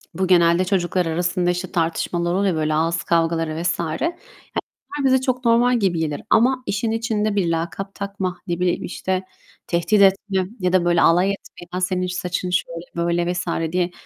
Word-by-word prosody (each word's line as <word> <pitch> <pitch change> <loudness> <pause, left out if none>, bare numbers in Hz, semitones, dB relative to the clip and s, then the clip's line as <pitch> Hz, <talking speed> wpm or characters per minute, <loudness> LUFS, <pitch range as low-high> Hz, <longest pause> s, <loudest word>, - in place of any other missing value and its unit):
bu 185 0 0
genelde 175 0 +4
çocuklar 180 -2 0
arasında 175 +2 0
işte 180 +1 -2
tartışmalar 170 0 -1
oluyor 195 -1 +1
ya 160 - -2
böyle 155 0 0
ağız 165 +2 0
kavgaları 165 -1 0
vs. 175 0 0
Ya, 160 -1 -2
bunlar - - -4 0.7
bize 260 0 +4
çok 255 -1 -1
normal 240 +1 +4
gibi 185 -5 +1
gelir. 155 0 -2
Ama 255 +3 +4
işin 220 +3 -1
içinde 215 -2 -1
bir 180 -4 +1
lakap 170 +4 -3
takma, 195 -2 -4
ne 175 0 -2
bileyim, 180 -1 0
işte, 185 0 -2 0.4
tehdit 200 +4 +2
etme 195 0 +3 0.2
ya 180 0 +1
da 185 -2 +3
böyle 175 -1 +3
alay 180 +4 +4
etme, 195 -2 -8
"Ya, 185 - -1
senin 185 0 0
saçın 180 0 -3
şöyle, 175 -1 -2 0.2
böyle" 175 +1 +1
vs. 175 0 -3 0.3
diye 180 0 +1
180 Hz, 180 wpm, -21 LUFS, 170-200 Hz, 0.7 s, genelde